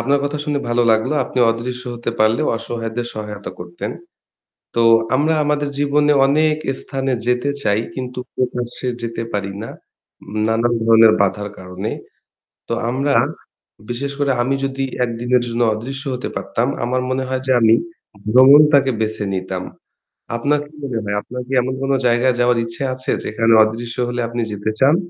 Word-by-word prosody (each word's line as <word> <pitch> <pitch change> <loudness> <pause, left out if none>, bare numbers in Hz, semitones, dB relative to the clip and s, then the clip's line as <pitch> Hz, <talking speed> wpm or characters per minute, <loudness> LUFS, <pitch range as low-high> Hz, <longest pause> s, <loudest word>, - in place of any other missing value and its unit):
আপনার 140 +3 +2
কথা 145 +1 -2
শুনে 145 -2 0
ভালো 120 0 +2
লাগলো। 110 +7 +1
আপনি - - -5
অদৃশ্য 125 +2 -4
হতে 120 0 -3
পারলে 110 +1 +3
অসহায়দের 115 0 -4
সহায়তা 105 -1 -6
করতেন। 85 0 -6 0.8
তো 115 - +2 0.3
আমরা 155 +4 +2
আমাদের 145 0 0
জীবনে 145 +1 +3
অনেক 155 +2 +3 0.2
স্থানে 135 -1 -2
যেতে 125 +3 +1
চাই 105 -2 +2
কিন্তু 125 -1 -5 0.2
প্রকাশে 125 0 -2 0.2
যেতে 115 0 -3
পারি 100 -1 -2
না, 115 - -6 0.8
নানান 115 +2 +1
ধরনের 115 -1 +7
বাধার 100 +1 -1
কারণে। 95 +3 -5 0.8
তো - - -2 0.2
আমরা, 135 +3 0 0.8
বিশেষ 135 +4 -3
করে 140 -1 +2
আমি 135 +2 0
যদি 135 0 -3 0.2
একদিনের 120 +1 0
জন্য 120 0 -2
অদৃশ্য 135 +6 -6
হতে 125 - -4
পারতাম, - - -1 0.2
আমার 125 +1 0
মনে 130 0 0
হয় 130 0 -2
যে - - +2
আমি 115 0 +6 0.6
ভ্রমণটাকে 140 +2 +7
বেছে 110 -1 -2
নিতাম। 95 -1 -3 0.7
আপনার 145 +5 +1
কি 150 - -22
মনে 130 -4 -2
হয়, 100 0 -2
আপনার 125 +3 -7
কি 135 - -5
এমন 130 +1 -2
কোন 135 - 0 0.2
জায়গায় 120 +1 +3
যাওয়ার 120 0 +3
ইচ্ছে 115 +4 -6
আছে 130 0 -3
যেখানে 115 +1 +2
অদৃশ্য 115 +2 -4
হলে 120 0 -3
আপনি 120 0 -3
যেতে 105 +1 -2
চান? 140 +4 +6
120 Hz, 160 wpm, -19 LUFS, 115-135 Hz, 0.8 s, ধরনের